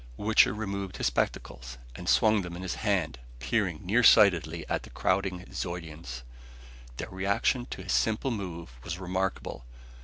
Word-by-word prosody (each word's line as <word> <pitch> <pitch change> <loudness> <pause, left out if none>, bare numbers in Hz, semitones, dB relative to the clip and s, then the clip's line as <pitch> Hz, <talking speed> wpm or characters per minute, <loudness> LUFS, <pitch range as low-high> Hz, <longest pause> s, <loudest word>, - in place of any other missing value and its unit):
Wichter 110 +1 +4
removed 100 -3 -4
his - - -2
spectacles, - - -2 0.2
and - - -4
swung 110 -1 +4
them 90 -2 -6
in 90 - -7
his 95 - -2
hand, 90 - -1 0.2
peering 85 - -1
near 110 +7 +3
sightedly 85 -8 +5
at - - -1
the - - -12
crowding 95 -1 -1
Zeudians. 80 -8 -5 0.7
Their - - -5
reaction 100 +6 0
to 95 - -7
his 95 - -2
simple 110 +4 +1
move 90 - -5
was 85 - -4
remarkable! 95 -7 -3
95 Hz, 150 wpm, -29 LUFS, 85-100 Hz, 0.7 s, sightedly